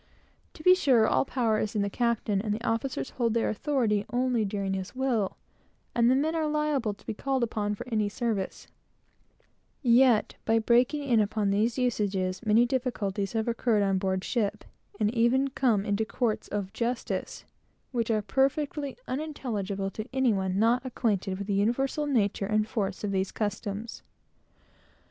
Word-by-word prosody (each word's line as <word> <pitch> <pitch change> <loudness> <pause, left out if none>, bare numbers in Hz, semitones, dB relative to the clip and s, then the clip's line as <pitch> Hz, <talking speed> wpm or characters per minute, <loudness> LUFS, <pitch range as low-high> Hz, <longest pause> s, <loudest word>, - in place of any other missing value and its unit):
To 310 - -12
be 365 - +8
sure, 260 -11 +4
all - - +2
power 230 -5 +1
is 215 - -2
in 205 - +2
the - - 0
captain, 225 -2 0
and 210 0 -2
the 220 +3 -3
officers 225 - -2
hold 235 -3 0
their 230 - +1
authority 220 -4 0
only 245 -2 +1
during 195 -1 -2
his 190 +3 -5
will; 245 -7 0 0.6
and 235 0 +4
the 255 - +4
men 305 +4 +1
are 320 -2 0
liable 300 -8 0
to - - -23
be - - -3
called 265 +3 -1
upon 210 -2 -1
for 205 - -8
any 215 -4 0
service; 210 -3 -3 1.2
yet, 240 -2 +4
by 225 0 +2
breaking 245 +6 +2
in 245 -5 +3
upon 210 -1 +1
these 220 +5 +1
usages, 200 -6 -1
many 225 +2 +4
difficulties 220 -6 -2
have 225 0 -1
occurred 230 -2 +1
on 195 -1 +1
board 190 -1 -1
ship, 215 -3 -1 0.4
and 210 +1 +1
even 250 +3 +3
come 230 -7 +1
into 205 +1 0
courts 225 0 -1
of 200 -1 -4
justice, 235 +2 -3 0.5
which 235 -3 -1
are 215 -2 +1
perfectly 275 +5 0
unintelligible 215 -9 -3
to 215 +2 -7
any 260 -3 +2
one 190 -1 -1
not 235 +4 +3
acquainted 205 -7 -1
with 200 - -5
the 200 - -1
universal 255 +9 0
nature 205 -7 +1
and 215 0 +1
force 200 -3 -3
of 205 - -1
these 190 0 -1
customs. 210 +1 -4
225 Hz, 165 wpm, -28 LUFS, 205-255 Hz, 1.2 s, be